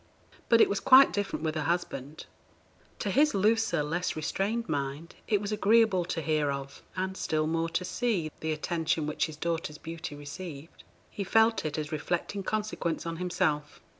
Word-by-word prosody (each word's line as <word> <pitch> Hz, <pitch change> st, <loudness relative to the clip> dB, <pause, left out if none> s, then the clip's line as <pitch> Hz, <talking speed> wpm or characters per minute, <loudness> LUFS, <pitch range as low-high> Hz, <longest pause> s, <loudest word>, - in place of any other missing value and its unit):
But 230 Hz, -1 st, +6 dB
it -, -, +7 dB
was 200 Hz, -, -1 dB
quite 270 Hz, +1 st, +7 dB
different 205 Hz, -5 st, -2 dB
with 155 Hz, -, 0 dB
her 155 Hz, -, -2 dB
husband. 155 Hz, -3 st, -3 dB, 0.7 s
To 200 Hz, -, -2 dB
his 295 Hz, +5 st, +3 dB
looser, 210 Hz, -5 st, +2 dB
less 175 Hz, +4 st, -2 dB
restrained 200 Hz, +9 st, -1 dB
mind, 145 Hz, +3 st, -3 dB
it 210 Hz, -, +2 dB
was 205 Hz, +1 st, -4 dB
agreeable 210 Hz, -3 st, +3 dB
to 165 Hz, -2 st, -3 dB
hear 150 Hz, -1 st, +1 dB
of, 140 Hz, 0 st, -6 dB
and 190 Hz, 0 st, -2 dB
still 155 Hz, -4 st, 0 dB
more 165 Hz, +1 st, 0 dB
to 180 Hz, -, -2 dB
see, 195 Hz, -9 st, -1 dB
the 160 Hz, -, -2 dB
attention 160 Hz, 0 st, -1 dB
which 150 Hz, +2 st, 0 dB
his 155 Hz, -2 st, -9 dB
daughter's 165 Hz, -2 st, -2 dB
beauty 160 Hz, -2 st, -7 dB
received. 145 Hz, +1 st, -9 dB, 0.3 s
He 200 Hz, -, -4 dB
felt 225 Hz, +2 st, +3 dB
it 155 Hz, 0 st, -2 dB
as 155 Hz, 0 st, -3 dB
reflecting 175 Hz, +6 st, -2 dB
consequence 210 Hz, -6 st, -2 dB
on 165 Hz, 0 st, -3 dB
himself. 175 Hz, -4 st, -1 dB
170 Hz, 170 wpm, -29 LUFS, 155-205 Hz, 0.7 s, it